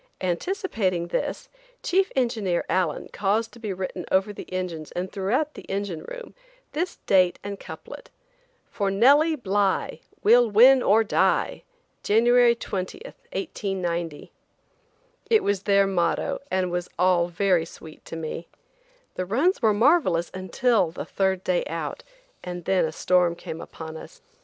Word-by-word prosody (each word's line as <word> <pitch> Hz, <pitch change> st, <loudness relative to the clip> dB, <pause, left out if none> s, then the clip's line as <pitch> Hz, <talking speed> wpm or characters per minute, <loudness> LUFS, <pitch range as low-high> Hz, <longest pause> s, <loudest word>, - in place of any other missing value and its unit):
Anticipating 185 Hz, -, -1 dB
this, -, -, -3 dB, 0.4 s
Chief 380 Hz, +2 st, +2 dB
engineer 220 Hz, -9 st, 0 dB
Allen 180 Hz, -5 st, 0 dB
caused 215 Hz, +3 st, 0 dB
to 235 Hz, -, -15 dB
be 215 Hz, -3 st, -4 dB
written 185 Hz, -1 st, -4 dB
over 195 Hz, +2 st, +2 dB
the -, -, -10 dB
engines 175 Hz, -4 st, -4 dB
and 180 Hz, +1 st, -4 dB
throughout 255 Hz, +11 st, -1 dB
the -, -, -10 dB
engine 195 Hz, -4 st, -3 dB
room, -, -, -9 dB, 0.4 s
this 345 Hz, +4 st, -2 dB
date 185 Hz, -2 st, +4 dB
and 200 Hz, -1 st, -6 dB
couplet: -, -, -10 dB, 0.6 s
"For 200 Hz, -2 st, -1 dB
Nellie 285 Hz, +11 st, +5 dB
Bly, 200 Hz, -6 st, 0 dB, 0.2 s
We'll 235 Hz, +2 st, +6 dB
win 250 Hz, +5 st, +7 dB
or 220 Hz, 0 st, +4 dB
die. 215 Hz, -, +1 dB, 0.4 s
January 240 Hz, +2 st, +4 dB
20, 195 Hz, -, -5 dB
1890." 190 Hz, -, -4 dB, 1.0 s
It 445 Hz, -2 st, +4 dB
was 200 Hz, -2 st, 0 dB
their 200 Hz, -1 st, +3 dB
motto 195 Hz, +9 st, 0 dB
and 185 Hz, -1 st, 0 dB
was 175 Hz, 0 st, -3 dB
all 180 Hz, -2 st, +3 dB
very 180 Hz, -1 st, +1 dB
sweet 160 Hz, -1 st, -13 dB
to -, -, -7 dB
me. 165 Hz, +1 st, -5 dB, 0.7 s
The 185 Hz, -, -3 dB
runs 280 Hz, -, +1 dB
were 220 Hz, -3 st, +4 dB
marvelous 205 Hz, -, +3 dB
until 190 Hz, +1 st, +1 dB
the 165 Hz, -, -7 dB
third 190 Hz, -1 st, 0 dB
day 180 Hz, -1 st, +1 dB
out, 165 Hz, -2 st, -5 dB, 0.4 s
and 175 Hz, -1 st, -6 dB
then 190 Hz, -3 st, +2 dB
a 160 Hz, -, -3 dB
storm 175 Hz, +1 st, +2 dB
came 165 Hz, -1 st, -7 dB
upon 160 Hz, -1 st, -8 dB
us. -, -, -13 dB
195 Hz, 140 wpm, -25 LUFS, 175-235 Hz, 1.0 s, win